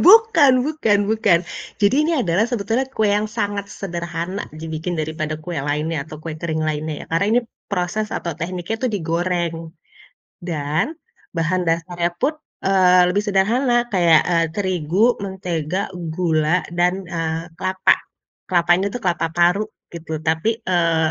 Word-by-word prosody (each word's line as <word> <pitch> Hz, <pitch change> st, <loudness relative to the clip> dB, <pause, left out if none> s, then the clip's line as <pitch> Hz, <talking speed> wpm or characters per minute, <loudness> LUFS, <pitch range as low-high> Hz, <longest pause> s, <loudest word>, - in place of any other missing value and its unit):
bukan 330 Hz, -, +7 dB
bukan 260 Hz, -10 st, +2 dB
bukan. 210 Hz, -6 st, +4 dB, 0.4 s
Jadi 205 Hz, +4 st, +4 dB
ini 335 Hz, -, +1 dB
adalah 185 Hz, 0 st, +2 dB
sebetulnya 235 Hz, +2 st, -1 dB
kue 220 Hz, -5 st, +1 dB
yang 210 Hz, +1 st, +1 dB
sangat 200 Hz, -1 st, -3 dB
sederhana 175 Hz, 0 st, -4 dB
dibikin 160 Hz, +2 st, -4 dB
daripada 155 Hz, 0 st, -3 dB
kue 155 Hz, +1 st, -6 dB
lainnya 150 Hz, +1 st, -2 dB
atau 155 Hz, 0 st, -9 dB
kue 160 Hz, -1 st, -5 dB
kering 160 Hz, -2 st, -2 dB
lainnya 155 Hz, 0 st, -3 dB
ya, -, -, -21 dB
karena 165 Hz, +5 st, +2 dB
ini -, -, +2 dB, 0.3 s
proses 200 Hz, +3 st, -1 dB
atau 170 Hz, -, -3 dB
tekniknya 180 Hz, +5 st, -3 dB
itu 255 Hz, -, +1 dB
digoreng 170 Hz, -2 st, -1 dB, 0.8 s
dan 155 Hz, -, -1 dB, 0.4 s
bahan 170 Hz, +2 st, +1 dB
dasarnya 170 Hz, +1 st, 0 dB
pun, 280 Hz, -, 0 dB, 0.3 s
eee, 185 Hz, -2 st, +5 dB
lebih 200 Hz, +3 st, +1 dB
sederhana, 240 Hz, +5 st, +2 dB
kayak, 170 Hz, -4 st, +5 dB
eee, 165 Hz, -2 st, +2 dB
terigu, 185 Hz, +3 st, +1 dB
mentega, 185 Hz, -1 st, -3 dB
gula, 165 Hz, -1 st, 0 dB
dan, 180 Hz, +2 st, +1 dB
eee, 165 Hz, -1 st, -2 dB, 0.2 s
kelapa. 185 Hz, 0 st, +3 dB, 0.5 s
Kelapa 175 Hz, -1 st, +1 dB
ini 195 Hz, -, 0 dB
tuh 245 Hz, +5 st, -6 dB
kelapa 170 Hz, -2 st, +1 dB
parut 180 Hz, +5 st, +3 dB, 0.2 s
gitu, 160 Hz, -2 st, -5 dB
tapi, 160 Hz, +8 st, +1 dB
eee, 165 Hz, -4 st, +2 dB
175 Hz, 140 wpm, -21 LUFS, 165-200 Hz, 0.8 s, bukan